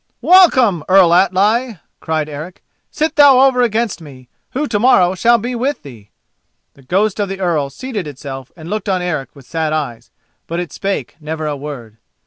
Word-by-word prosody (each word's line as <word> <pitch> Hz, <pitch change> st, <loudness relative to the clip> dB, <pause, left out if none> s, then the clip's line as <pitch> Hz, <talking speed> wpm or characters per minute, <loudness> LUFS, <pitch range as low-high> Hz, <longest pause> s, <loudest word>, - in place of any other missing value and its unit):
"Welcome, 260 Hz, -, +5 dB
Earl 185 Hz, -3 st, +5 dB
Atli!" 205 Hz, +6 st, +2 dB, 0.2 s
cried 155 Hz, -1 st, -2 dB
Eric. 155 Hz, +5 st, -9 dB, 0.3 s
"Sit 310 Hz, 0 st, -2 dB
thou 285 Hz, -3 st, +7 dB
over 265 Hz, -2 st, +4 dB
against 225 Hz, -5 st, -1 dB
me, 130 Hz, -5 st, -14 dB, 0.2 s
who 290 Hz, +4 st, -2 dB
to 210 Hz, -, -1 dB
morrow 190 Hz, -7 st, +4 dB
shall 235 Hz, +5 st, +3 dB
be 240 Hz, +3 st, -4 dB
with 260 Hz, +4 st, -2 dB
thee." 115 Hz, -7 st, -13 dB, 0.6 s
The 140 Hz, -, -20 dB
ghost 195 Hz, +10 st, 0 dB
of 200 Hz, -2 st, -1 dB
the 195 Hz, 0 st, -5 dB
Earl 165 Hz, -7 st, 0 dB
seated 210 Hz, -, -6 dB
itself 135 Hz, -2 st, -8 dB
and 160 Hz, -1 st, -10 dB
looked 210 Hz, +2 st, -3 dB
on 185 Hz, -2 st, 0 dB
Eric 155 Hz, -7 st, -4 dB
with 140 Hz, -3 st, -15 dB
sad 160 Hz, +2 st, -2 dB
eyes, 120 Hz, -7 st, -4 dB, 0.4 s
but 170 Hz, +1 st, -3 dB
it 175 Hz, -2 st, -6 dB
spake 195 Hz, 0 st, -4 dB
never 155 Hz, 0 st, -5 dB
a 150 Hz, -1 st, -2 dB
word. 135 Hz, -6 st, -9 dB
180 Hz, 180 wpm, -16 LUFS, 150-230 Hz, 0.6 s, thou